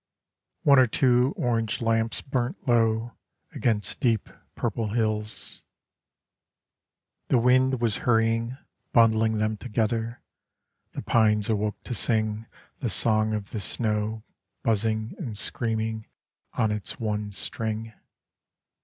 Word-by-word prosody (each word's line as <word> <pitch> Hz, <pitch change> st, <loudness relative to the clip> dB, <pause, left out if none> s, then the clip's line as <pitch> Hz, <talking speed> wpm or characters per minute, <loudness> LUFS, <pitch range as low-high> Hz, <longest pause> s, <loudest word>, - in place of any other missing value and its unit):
One 140 Hz, -2 st, +6 dB
or 130 Hz, -, +6 dB
two 125 Hz, +2 st, +2 dB
orange 115 Hz, -3 st, 0 dB
lamps 115 Hz, -1 st, 0 dB
burnt 130 Hz, 0 st, -3 dB
low 115 Hz, -1 st, +2 dB, 0.4 s
Against 105 Hz, -5 st, 0 dB
deep 115 Hz, -5 st, +1 dB, 0.3 s
purple 115 Hz, -1 st, -2 dB
hills 110 Hz, -2 st, -1 dB, 1.7 s
The 130 Hz, -, +3 dB
wind 130 Hz, +2 st, +3 dB
was 115 Hz, -3 st, 0 dB
hurrying, 115 Hz, +1 st, +1 dB, 0.4 s
bundling 110 Hz, -1 st, +4 dB
them 110 Hz, 0 st, 0 dB
together, 115 Hz, +1 st, -2 dB, 0.7 s
The -, -, -5 dB
pines 105 Hz, -2 st, +2 dB
awoke 105 Hz, -1 st, -1 dB
to -, -, -5 dB
sing 110 Hz, -1 st, +1 dB, 0.3 s
The -, -, -2 dB
song 110 Hz, -1 st, +3 dB
of 105 Hz, -1 st, -6 dB
the 110 Hz, -, -3 dB
snow 105 Hz, +1 st, -1 dB, 0.4 s
buzzing 110 Hz, 0 st, 0 dB
and 120 Hz, -, -5 dB
screaming 110 Hz, -1 st, -2 dB, 0.5 s
On 110 Hz, -, +1 dB
its 105 Hz, -1 st, -4 dB
one 105 Hz, -2 st, -2 dB
string. 110 Hz, +3 st, -3 dB
110 Hz, 110 wpm, -26 LUFS, 110-120 Hz, 1.7 s, One